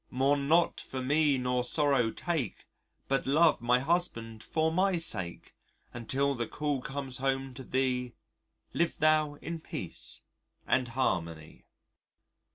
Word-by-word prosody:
Mourn 140 +2 +1
not 170 +3 +3
for 130 - -6
me 145 +2 +2
nor 125 0 0
sorrow 135 -3 +2
take 150 - -3 0.4
But 135 -1 0
love 155 0 +4
my 120 +1 +4
husband 125 -7 -1
for 160 +5 0
my 185 +2 +2
sake 95 - -3 0.4
Until 135 +4 0
the 120 -3 -3
call 145 -3 -2
comes 135 -1 -4
home 135 0 -1
to 130 - -8
thee, 125 -1 -1 0.6
Live 170 0 0
thou 155 -1 +3
in 165 +1 -4
peace - - -6 0.4
and 130 -1 +2
harmony.'" 85 -10 -2
135 Hz, 130 wpm, -30 LUFS, 125-155 Hz, 0.6 s, love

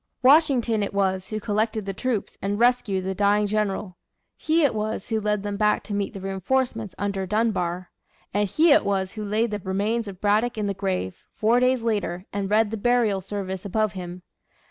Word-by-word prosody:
Washington 260 -6 +4
it 200 0 -3
was 190 -1 0
who 215 - -3
collected 215 0 -1
the 195 - -3
troops 235 0 -2
and 200 +1 -1
rescued 235 -5 +2
the 190 - -1
dying 205 +1 +2
general. 205 -3 -2 0.4
He 320 +1 +1
it 280 - +3
was 215 -1 -3
who 220 - +1
led 210 -1 -1
them 205 -1 -3
back 210 0 +2
to 210 - -6
meet 200 +1 -2
the - - -5
reinforcements 210 +3 -2
under 195 -2 -2
Dunbar. 185 -4 -1 0.4
And 205 0 +1
he 320 - +4
it - - +6
was 195 -2 -1
who 215 - -5
laid 215 +2 0
the 210 - -2
remains 205 +4 -1
of 190 -2 -8
Braddock 215 +4 +1
in 210 - -1
the 200 - -1
grave, 185 - -3
four 230 +3 +3
days 250 -1 +2
later, 205 -5 -1
and 200 -1 -2
read 215 0 +3
the 225 - -3
burial 225 -3 +2
service 190 -1 -5
above 215 +1 0
him. 180 -1 -7
205 Hz, 195 wpm, -24 LUFS, 195-225 Hz, 0.4 s, it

